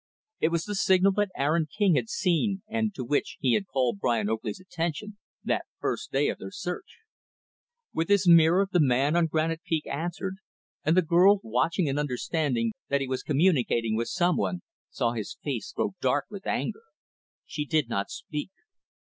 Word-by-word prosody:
It - - +3
was 170 -1 -1
the 210 - -4
signal 190 0 +4
that 205 +1 0
Aaron 155 +3 +1
King 200 +4 +2
had 125 -6 0
seen 195 +2 0
and 220 -1 -1
to 130 - -4
which 145 +4 -1
he 130 -4 +2
had 195 - 0
called 125 - 0
Brian 110 -3 +1
Oakley's 110 -1 -3
attention, 185 +3 -4 0.3
that - - -1
first - - -3
day - - +2
of - - -4
their - - -7
search. - - -6 0.9
With 165 +2 -1
his 200 -2 +3
mirror, 170 +3 +6
the 180 - +3
man 140 +1 +3
on 170 -1 +3
Granite 160 +1 -1
Peak 160 -2 -1
answered 175 +5 -4 0.5
and 160 +4 +2
the 185 - +5
girl, 180 +5 +5
watching 130 - 0
and 140 +1 0
understanding 130 -3 -1 0.2
that 140 0 +1
he 135 - -2
was 130 0 -2
communicating 135 -8 +2
with 115 +1 -1
some 175 -1 +1
one, 180 - -2 0.3
saw - - 0
his - - -5
face - - -3
grow - - -2
dark - - +1
with - - -8
anger. 440 - -2 0.6
She 150 - -4
did 150 -3 +1
not 100 -4 -2
speak. 150 +3 -5
160 Hz, 180 wpm, -27 LUFS, 135-185 Hz, 0.9 s, mirror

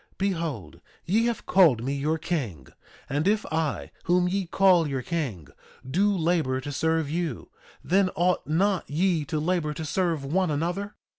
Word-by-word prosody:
2:18 - - -37
Behold, 155 - -3 0.2
ye 220 +6 +2
have 235 - -3
called 160 -12 +4
me 135 +2 -1
your 150 +3 0
king; 130 - -3 0.4
and 145 +5 -1
if 210 +1 +2
I, 160 -2 -2
whom 180 +1 +3
ye 190 0 -1
call 180 -3 +4
your 135 -3 -3
king, 120 - -3 0.4
do 195 +10 +2
labor 160 -6 +1
to 145 +2 -6
serve 160 +1 0
you, 160 -4 -3 0.3
then 190 +1 +3
ought 180 +1 +1
not 185 +5 +1
ye 165 +1 +1
to 150 +2 -2
labor 155 -2 -1
to 160 - -5
serve 165 -3 -1
one 180 +5 +1
another? 175 +7 -2
165 Hz, 165 wpm, -26 LUFS, 145-185 Hz, 0.4 s, called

